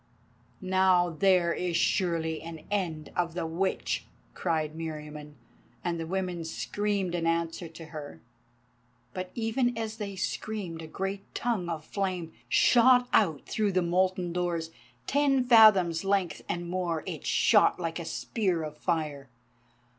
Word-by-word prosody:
"Now 185 Hz, -2 st, +3 dB
there 175 Hz, 0 st, +3 dB
is 175 Hz, -2 st, -1 dB
surely 165 Hz, -5 st, 0 dB
an 165 Hz, -1 st, -8 dB
end 165 Hz, -7 st, -2 dB
of 170 Hz, -1 st, -1 dB
the 175 Hz, -, -2 dB
Witch," 175 Hz, +4 st, -1 dB, 0.3 s
cried 155 Hz, -3 st, -1 dB
Meriamun, 150 Hz, -2 st, -7 dB, 0.5 s
and 170 Hz, -1 st, -1 dB
the 165 Hz, -, -4 dB
women 180 Hz, -2 st, -2 dB
screamed 200 Hz, +2 st, -2 dB
an 170 Hz, -1 st, -1 dB
answer 165 Hz, +1 st, -1 dB
to 165 Hz, 0 st, -11 dB
her. 150 Hz, -2 st, -9 dB, 0.9 s
But 185 Hz, 0 st, -4 dB
even 235 Hz, +1 st, 0 dB
as 220 Hz, -1 st, -4 dB
they 200 Hz, -3 st, -5 dB
screamed 190 Hz, -3 st, -4 dB
a 160 Hz, -, -8 dB
great 195 Hz, +4 st, -5 dB
tongue 215 Hz, -8 st, -1 dB
of 155 Hz, -2 st, -4 dB
flame 185 Hz, -4 st, -3 dB, 0.2 s
shot 245 Hz, -, +5 dB
out 160 Hz, -10 st, +3 dB
through 210 Hz, -3 st, 0 dB
the 185 Hz, 0 st, +2 dB
molten 180 Hz, 0 st, +1 dB
doors, 170 Hz, -2 st, -2 dB, 0.3 s
ten 275 Hz, -2 st, +2 dB
fathoms 210 Hz, -9 st, +6 dB
length 195 Hz, -3 st, 0 dB
and 175 Hz, 0 st, -2 dB
more, 175 Hz, -3 st, -2 dB
it -, -, -5 dB
shot -, -, +4 dB
like -, -, -3 dB
a -, -, -5 dB
spear 185 Hz, -8 st, -1 dB
of 150 Hz, -1 st, -7 dB
fire. 150 Hz, -6 st, -2 dB
175 Hz, 140 wpm, -29 LUFS, 165-195 Hz, 0.9 s, fathoms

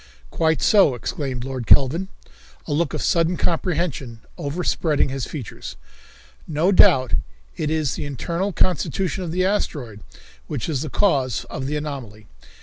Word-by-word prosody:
"Quite 160 Hz, -1 st, +1 dB
so," 195 Hz, -, +5 dB
exclaimed 130 Hz, -, -4 dB
Lord 130 Hz, -3 st, -5 dB
Kelvin, 155 Hz, +8 st, +4 dB, 0.6 s
a -, -, -2 dB
look 155 Hz, 0 st, 0 dB
of -, -, -3 dB
sudden 170 Hz, +1 st, +2 dB
comprehension 160 Hz, -9 st, -1 dB
overspreading 150 Hz, -1 st, 0 dB
his 135 Hz, -2 st, -3 dB
features. 135 Hz, -9 st, -7 dB, 0.7 s
"No 160 Hz, +5 st, +2 dB
doubt 130 Hz, -9 st, +5 dB, 0.4 s
it 155 Hz, -, -2 dB
is 155 Hz, -4 st, 0 dB
the -, -, -4 dB
internal 170 Hz, -, -2 dB
constitution 185 Hz, +1 st, 0 dB
of 170 Hz, -, -4 dB
the 185 Hz, +2 st, +1 dB
asteroid 145 Hz, -, -2 dB, 0.5 s
which -, -, -3 dB
is 145 Hz, -5 st, -1 dB
the 155 Hz, -, -4 dB
cause 135 Hz, -, +1 dB
of 130 Hz, -, -4 dB
the 150 Hz, -, -2 dB
anomaly. 130 Hz, -8 st, -6 dB
150 Hz, 145 wpm, -22 LUFS, 130-175 Hz, 0.7 s, so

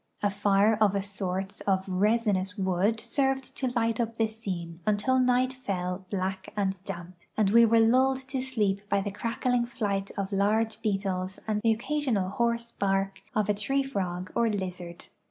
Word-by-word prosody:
A 205 Hz, -, +3 dB
fire 205 Hz, +1 st, +3 dB
of 200 Hz, -2 st, +4 dB
a 200 Hz, -, +1 dB
sort 195 Hz, 0 st, -3 dB
of 190 Hz, -1 st, +2 dB
resinous 205 Hz, 0 st, +1 dB
wood 190 Hz, +3 st, +1 dB
served 270 Hz, -1 st, -1 dB
to 260 Hz, -, 0 dB
light 230 Hz, -2 st, 0 dB
up 230 Hz, -1 st, -1 dB
the 225 Hz, -, +3 dB
scene 185 Hz, -7 st, -5 dB
until 215 Hz, +5 st, +2 dB
night 255 Hz, +1 st, +3 dB
fell 185 Hz, -6 st, -4 dB
black 190 Hz, -1 st, -3 dB
and 190 Hz, -2 st, -1 dB
damp, 175 Hz, +1 st, -7 dB, 0.2 s
and 205 Hz, -2 st, +3 dB
we 235 Hz, +1 st, +7 dB
were 230 Hz, 0 st, +4 dB
lulled 260 Hz, +3 st, +3 dB
to 265 Hz, -1 st, -1 dB
sleep 210 Hz, -7 st, 0 dB
by 200 Hz, -, +3 dB
the 205 Hz, +1 st, -3 dB
crackling 235 Hz, +3 st, 0 dB
flight 205 Hz, -5 st, -2 dB
of 195 Hz, 0 st, -2 dB
large 215 Hz, +3 st, +1 dB
beetles 190 Hz, -3 st, -1 dB
and 210 Hz, -1 st, 0 dB
the 225 Hz, -, +3 dB
occasional 235 Hz, -5 st, -1 dB
hoarse 235 Hz, +1 st, 0 dB
bark 195 Hz, 0 st, -1 dB
of 215 Hz, -2 st, +2 dB
a 210 Hz, -, +3 dB
tree 270 Hz, +7 st, 0 dB
frog 185 Hz, -8 st, -3 dB
or 235 Hz, -1 st, +2 dB
lizard. 180 Hz, -4 st, -5 dB
205 Hz, 175 wpm, -28 LUFS, 195-235 Hz, 0.2 s, we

